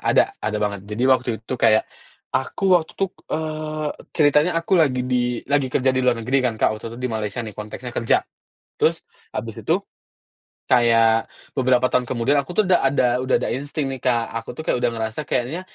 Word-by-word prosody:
ada - - +3
ada 105 0 -2
banget. 100 -1 -1
Jadi 105 +3 -3
waktu 130 -1 +3
itu 120 - -4
kayak, 110 0 +4 0.5
aku 130 +8 -2
waktu 160 - -8
itu 195 - +1
k - - -55 0.2
eee, 155 -1 -3 0.3
ceritanya 150 +2 +4
aku 165 +3 -5
lagi 130 -5 +2
di 125 -1 0
lagi 140 -2 +2
kerja 130 +1 +2
di 130 - +1
luar 125 -1 +2
negeri 135 +3 +2
kan 125 -3 0
Kak, - - +3
waktu 115 - -8
itu - - -10
di 125 0 -2
Malaysia 110 0 -3
nih, 110 - -7
konteksnya 110 +4 -7
kerja. 115 - +2 0.6
Terus - - +2 0.3
habis - - -4
itu - - +2 0.9
kayak 115 -2 +4 0.2
beberapa 130 -1 +3
tahun 125 - +1
kemudian 125 +3 0
aku 135 - -9
tuh 215 +4 +2
udah 180 -5 +3
ada 125 -2 +2
udah 130 - +2
ada - - -2
insting 140 +2 -3
nih 130 -2 -5
Kak, 120 -3 +1
aku 115 - -5
tuh 160 - -5
kayak - - +2
udah - - +4
ngerasa 110 +4 -3
kayaknya 130 +9 -1
125 Hz, 200 wpm, -22 LUFS, 115-145 Hz, 0.9 s, kayak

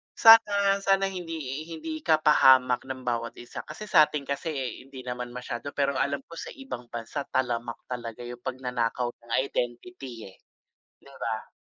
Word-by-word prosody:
sana 205 -3 +7
sana 195 0 +2
hindi 175 -3 -5 0.3
hindi 160 -1 -5
ka 155 -2 +3
pahamak 130 -3 +5
ng 130 -1 -6
bawat 120 -1 -2
isa. 120 - -8
Kasi 155 +7 -8
sa'tin 155 -6 +4
kasi 140 +4 -3 0.4
hindi 135 -2 -10
naman 125 -1 -5
masyado, 125 +2 -5
pero 140 -1 +1
alam 140 0 0
ko - - -14
sa - - -6
ibang 270 - -7
bansa 120 +5 -5
talamak 120 -2 -1
talaga 120 -1 -5
'yung 120 0 -7
pagnanakaw 125 -2 -2
ng 120 -1 -17
identity, 120 - -5
eh. - - -22 0.7
'Di - - -15
ba? - - -3
130 Hz, 155 wpm, -27 LUFS, 120-160 Hz, 0.7 s, sana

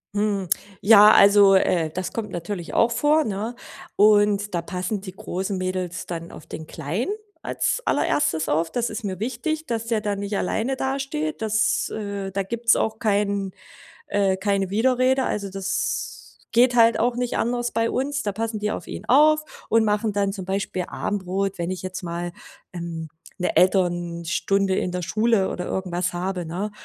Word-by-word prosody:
Mhm. 205 -3 0 0.3
Ja, 210 0 +8
also, 200 -1 +7
äh, 170 -4 +2
das 185 +4 -4
kommt 220 -2 -4
natürlich 175 +1 -5
auch 230 - +3
vor, 295 +6 +3
ne? 220 +1 -3 0.4
Und 205 -1 +4
da 170 - 0
passen 185 +4 -3
die 190 -2 -8
großen 190 +1 -3
Mädels 185 -1 -3
dann 170 -1 -6
auf - - -11
den 160 - -8
Kleinen 170 - -3 0.3
als - - -1
Allererstes 160 - +1
auf. 160 +2 +1
Das 240 -1 -1
ist 220 +1 -6
mir 190 -2 -4
wichtig, 260 +8 -2
dass 230 -1 -3
der 225 -2 0
da 205 -1 -1
nicht 200 0 -3
alleine 230 +8 -1
dasteht. 275 +3 -3
Das, 220 -1 +1
äh 200 -2 -4
da 195 +1 -1
gibt's 230 +3 +2
auch 220 0 -1
kein 200 -2 0 0.6
äh, 195 -2 +1
keine 195 -1 0
Widerrede. 255 +5 +2
Also, 200 -1 -2
das 195 0 -3 0.2
geht 245 +1 +4
halt 230 -1 +5
auch 240 +2 +1
nicht 245 -1 -1
anders 240 0 -1
bei 230 0 +1
uns. 280 +2 -1
Da 205 - -1
passen 220 +1 -3
die 210 0 -1
auf - - -5
ihn - - -7
auf 305 +3 +3
und 225 0 +4
machen 210 0 0
dann 200 -1 +1
zum 195 -2 -6
Beispiel 190 -1 -2
Abendbrot, 195 0 -2
wenn 170 0 -2
ich 185 -2 -4
jetzt 185 0 -5
mal, 175 0 -4 0.4
ähm, 170 -2 -6 0.3
'ne 180 - 0
Elternstunde 175 +1 +1
in 180 - -1
der 180 - -2
Schule 215 +2 +1
oder 180 - -4
irgendwas 180 -1 -2
habe, 180 0 -3
ne, 185 +6 -4
200 Hz, 170 wpm, -23 LUFS, 185-230 Hz, 0.6 s, Ja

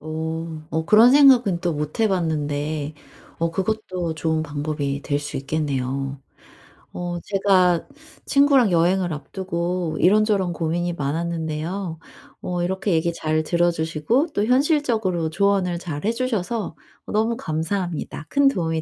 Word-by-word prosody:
어. 160 0 -5
어 160 0 -2
그런 225 +5 +7
생각은 255 -10 +6
또 175 -3 -1
못 150 +6 -4
해 220 - +4
봤는데 155 -4 -2 0.5
어 165 0 +1
그것도 185 -3 -2
좋은 160 0 0
방법이 145 -1 -3
될 145 0 -1
수 145 -1 -5
있겠네요. 135 -1 -2 0.7
어 175 -1 -4
제가 190 -3 +2 0.4
친구랑 275 -7 +4
여행을 175 +1 +2
앞두고 170 +2 -3
이런저런 200 -1 +3
고민이 170 +1 -1
많았는데요. 160 +3 -3 0.4
어 175 -1 -2
이렇게 190 +3 -1
얘기 165 +1 +1
잘 155 -1 -1
들어주시고 170 - +1
또 205 - +1
현실적으로 240 - +1
조언을 185 0 +1
잘 155 -2 -5
해 225 - +3
주셔서 230 -6 -2 0.4
너무 220 +2 +1
감사합니다. 165 0 -3
큰 280 -1 +4
도움이 165 -8 -1
170 Hz, 285 characters per minute, -22 LUFS, 155-200 Hz, 0.7 s, 그런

